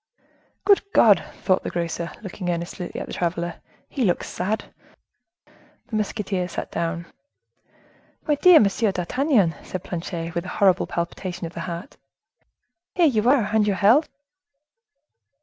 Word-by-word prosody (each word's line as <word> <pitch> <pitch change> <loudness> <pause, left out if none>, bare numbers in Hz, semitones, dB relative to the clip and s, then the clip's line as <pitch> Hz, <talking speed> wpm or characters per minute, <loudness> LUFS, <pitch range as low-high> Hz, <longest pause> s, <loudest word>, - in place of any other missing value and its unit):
"Good 405 -1 +6
God!" 210 -4 +6 0.2
thought 185 -1 +2
the - - -4
grocer, 170 0 -3
looking 185 -2 -5
earnestly 175 +1 -3
at - - -4
the - - -9
traveler, 170 -1 -2 0.3
"he 270 - -2
looks 180 -5 +1
sad!" 205 +5 -3 0.7
The 240 - -13
musketeer 200 -3 -2
sat 180 - -6
down. 170 0 -2 1.2
"My 300 - +3
dear 330 +4 +7
Monsieur 205 +1 +2
d'Artagnan!" 200 - +1
said 185 - -6
Planchet, 170 -1 -5
with 170 +1 -3
a - - -6
horrible 190 -2 +3
palpitation 175 +1 -4
of 165 - -7
the - - -7
heart. 170 +2 -7 1.0
"Here 350 - +4
you 235 -5 +3
are! 240 -7 +3
and 215 -1 +3
your 200 - +1
health?" 235 - +4
190 Hz, 140 wpm, -23 LUFS, 170-220 Hz, 1.2 s, dear